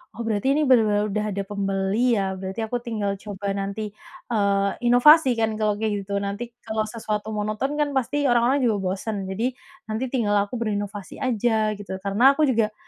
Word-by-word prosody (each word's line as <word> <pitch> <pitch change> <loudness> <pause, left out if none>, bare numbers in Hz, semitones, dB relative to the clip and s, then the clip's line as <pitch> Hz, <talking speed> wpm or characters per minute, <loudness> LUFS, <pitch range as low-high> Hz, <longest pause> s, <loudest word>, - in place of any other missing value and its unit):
oh, 235 - -6
berarti 225 +5 +1
ini 305 - +2
bener-bener 215 -5 +4
udah 210 +1 -1
ada 200 0 -2
pembeli 200 +4 0
ya, 195 -1 -1
berarti 190 +3 -5
aku 245 +3 -2
tinggal 215 -4 -2
coba 200 -1 -4
nanti, 200 +2 -4 0.4
eee, 200 -2 +2 0.2
inovasi 260 +1 +6
kan 220 -1 +1
kalau 210 -1 +1
kayak 210 -2 -1
gitu 200 +1 -3
nanti 200 +4 -4 0.2
kalau 220 -1 -1
sesuatu 215 -1 -4
monoton 215 +7 -2
kan 295 -1 0
pasti 285 +3 0
orang-orang 250 +2 +3
juga 220 -3 +2
bosen 195 +1 -3
jadi 230 +6 -1 0.3
nanti 220 +3 -3
tinggal 230 -6 0
aku 245 - -5
berinovasi 205 -3 -4
aja 220 -3 +1
gitu 205 -1 -9
karena 220 +8 +4
aku 305 +1 +2
juga 220 -3 +1
215 Hz, 175 wpm, -24 LUFS, 200-240 Hz, 0.4 s, inovasi